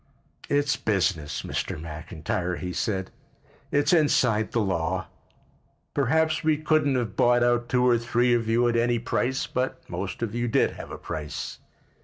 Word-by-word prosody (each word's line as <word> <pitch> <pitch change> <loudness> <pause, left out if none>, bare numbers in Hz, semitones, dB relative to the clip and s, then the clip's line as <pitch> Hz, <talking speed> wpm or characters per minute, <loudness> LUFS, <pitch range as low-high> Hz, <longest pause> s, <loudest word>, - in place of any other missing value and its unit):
"It's 145 -3 +2
business, 85 -8 0
Mr. - - -3
McIntyre," 80 +2 -4
he 90 0 -4
said. 95 +1 -2 0.6
"It's 145 +5 +3
inside 125 -9 +3
the 120 - +1
law. 90 -3 -1 0.9
Perhaps 160 +5 +2
we 155 -1 +3
couldn't 155 -2 +2
have 115 -6 -2
bought 120 0 +4
out 120 0 +2
two 125 0 +2
or 120 -2 +4
three 120 +1 +2
of 115 -2 +1
you 120 +2 +3
at 120 - +1
any 120 +1 +2
price, 125 +2 -1
but 130 +1 -3
most 95 +5 -4
of 110 -2 -3
you 120 0 -1
did 115 - +2
have - - -9
a - - -6
price. 75 -1 -5
120 Hz, 160 wpm, -26 LUFS, 95-125 Hz, 0.9 s, bought